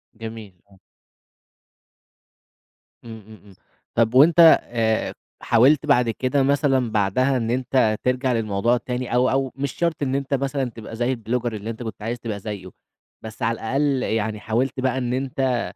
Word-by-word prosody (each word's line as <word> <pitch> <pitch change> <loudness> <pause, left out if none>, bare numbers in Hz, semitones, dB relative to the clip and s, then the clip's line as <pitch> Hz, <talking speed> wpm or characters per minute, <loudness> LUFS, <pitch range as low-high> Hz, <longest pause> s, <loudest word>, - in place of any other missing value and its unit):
جميل، 110 -5 -9
آه. 95 - -20 2.3
إمم، 110 -1 -9
إمم، 110 -1 -14
إمم. 100 -2 -17 0.4
طب 115 0 +2
وأنت 155 +6 +6 0.2
آآ 110 -2 -1 0.3
حاولت 130 +5 +4
بعد 125 -5 +3
كده 130 +4 0
مثلًا 135 -4 +1
بعدها 115 +6 +1
إن 115 -1 -2
أنت 125 -3 +1
ترجع 125 0 0
للموضوع 115 +1 +1
التاني 125 0 -4
أو 125 +1 +3
أو 135 -1 0
مش 140 0 -3
شرط 170 -3 -2
إن 135 -1 -1
أنت 140 0 -3
مثلًا 140 0 -1
تبقى 115 -1 -10
زي 120 +3 0
الBlogger 120 +1 -3
اللي 105 +1 -6
أنت 115 +1 -6
كنت 110 -2 -7
عايز 115 +3 -4
تبقى 110 -3 -5
زيّه، 100 -2 -7 0.5
بس 110 -1 -10
على 115 +1 +1
الأقل 135 +3 0
يعني 110 -1 -2
حاولت 125 +5 -1
بقى 130 0 0
إن 125 -1 -2
أنت 130 -2 -1
120 Hz, 160 wpm, -22 LUFS, 110-130 Hz, 2.3 s, وأنت